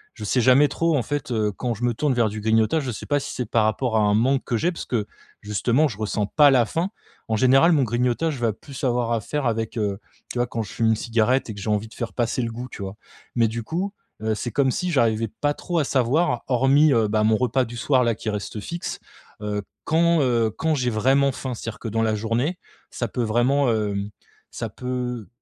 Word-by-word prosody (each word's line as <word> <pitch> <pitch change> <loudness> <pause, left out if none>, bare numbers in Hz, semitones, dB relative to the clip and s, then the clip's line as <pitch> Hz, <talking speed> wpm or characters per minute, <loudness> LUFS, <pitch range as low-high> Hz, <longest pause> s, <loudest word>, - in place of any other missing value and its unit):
je 110 - -9
sais 125 +4 +2
jamais 130 +4 +6
trop 165 +2 +1
en 125 - 0
fait 145 0 -3
,heu, 110 -2 +1
quand 120 +5 -2
je 115 - -8
me 120 - +1
tourne 145 +4 0
vers 120 -2 +2
du 105 +1 -6
grignotage, 110 +8 +2
je 130 - -3
sais 105 - -7
pas 145 -1 +2
si - - -6
c'est 125 - -3
par 115 - +3
rapport 110 +2 0
à - - +4
un 105 -1 +3
manque 130 +5 +2
que 120 - 0
j'ai 170 - +1
parce 170 - -6
que 110 -4 -1 0.3
justement 120 +8 +1
je 115 -8 -7
ressens 105 -1 -1
pas 145 +4 +5
la 125 -3 +4
faim. 165 - -2 0.4
En 110 - +1
général 135 +8 +5
mon 145 -4 +3
grignotage 125 +6 0
je 120 - -2
vais 115 - +2
plus 135 +4 -11
avoir 120 -2 +1
à 115 - 0
faire 145 +6 -3
avec, 115 +1 -2
heu, 100 -2 -1 0.3
tu - - -5
vois 120 - +1
quand 115 -2 -3
je 100 - -10
fume 115 -1 +1
une 110 - +4
cigarette 115 +3 +1
et 110 - -4
que 100 - -8
j'ai 110 - -3
envie 105 +1 0
de - - -16
faire 115 -4 -4
passer 120 +2 0
le 115 - -3
goût, 120 +2 -6
tu - - -8
vois? 95 +1 -7 0.4
Mais 115 -2 +4
du 115 +1 -4
coup, 180 - -3 0.3
heu, 110 0 0
c'est 120 +2 -4
comme 135 +3 +2
si 180 +7 -2
j'arrivais 115 -6 +2
pas 145 0 +2
trop 175 -2 -2
à 150 - +1
savoir 130 +1 +1
hormis, 135 +4 +4
heu, 115 -3 +3
bah, 105 +1 +1
mon 110 0 +3
repas 130 +1 +1
du 120 +1 -8
soir 130 +1 +2
là 120 -1 +2
qui 110 - -4
reste 105 +1 -4
fixe, 170 +9 -5 0.4
heu, 105 -1 -2 0.2
quand, 170 +1 +3
heu, 120 -4 +2
quand 160 -1 +1
j'ai 125 -3 0
vraiment 135 +5 +3
faim? 130 0 -5
C'est 115 - -5
a 115 - -8
dire 115 - -5
dans 115 +1 +1
la 110 -1 +1
journée 115 - -1 0.3
ça 120 - -3
peut 125 - -2
vraiment, 120 +4 +2
hem, 100 -2 -1 0.4
ça - - -4
peut 125 -3 -4
120 Hz, 250 wpm, -23 LUFS, 110-135 Hz, 0.4 s, jamais